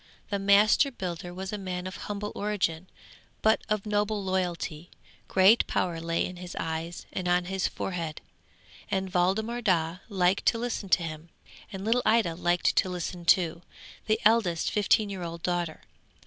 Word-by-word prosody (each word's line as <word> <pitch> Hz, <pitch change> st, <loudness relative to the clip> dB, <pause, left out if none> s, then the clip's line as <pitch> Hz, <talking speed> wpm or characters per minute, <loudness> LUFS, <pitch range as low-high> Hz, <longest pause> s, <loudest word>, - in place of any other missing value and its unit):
The 200 Hz, -, 0 dB
master 200 Hz, +7 st, +5 dB
builder 180 Hz, -7 st, -5 dB
was 190 Hz, +3 st, -6 dB
a 210 Hz, -, -3 dB
man 180 Hz, -2 st, -4 dB
of 185 Hz, -, -5 dB
humble 210 Hz, 0 st, -4 dB
origin, 190 Hz, -5 st, -1 dB, 0.6 s
but 220 Hz, 0 st, +4 dB
of 215 Hz, -1 st, 0 dB
noble 210 Hz, 0 st, 0 dB
loyalty; 180 Hz, -3 st, -2 dB, 0.4 s
great 195 Hz, +5 st, +5 dB
power 170 Hz, -2 st, -1 dB
lay 165 Hz, 0 st, 0 dB
in 180 Hz, -, -7 dB
his 180 Hz, 0 st, -8 dB
eyes 165 Hz, +1 st, -4 dB
and 180 Hz, -, -3 dB
on 175 Hz, 0 st, +2 dB
his 190 Hz, +1 st, -1 dB
forehead, 170 Hz, -4 st, -4 dB, 0.7 s
and 190 Hz, -1 st, -2 dB
Waldemar 215 Hz, +7 st, +1 dB
Daa 175 Hz, -4 st, +1 dB
liked 185 Hz, -1 st, +1 dB
to 230 Hz, -, +4 dB
listen 230 Hz, -4 st, -3 dB
to 180 Hz, -, +4 dB
him, 160 Hz, 0 st, -7 dB, 0.4 s
and 195 Hz, 0 st, -6 dB
little 235 Hz, +3 st, +3 dB
Ida 220 Hz, -7 st, +3 dB
liked 175 Hz, +1 st, +1 dB
to 185 Hz, -, +3 dB
listen 175 Hz, -1 st, -5 dB
too, 170 Hz, -1 st, +3 dB, 0.5 s
the 215 Hz, 0 st, +2 dB
eldest 210 Hz, -7 st, +3 dB
fifteen 210 Hz, 0 st, +2 dB
year 190 Hz, -2 st, -5 dB
old 170 Hz, -1 st, -6 dB
daughter. 175 Hz, -3 st, -2 dB
185 Hz, 160 wpm, -28 LUFS, 175-205 Hz, 0.7 s, master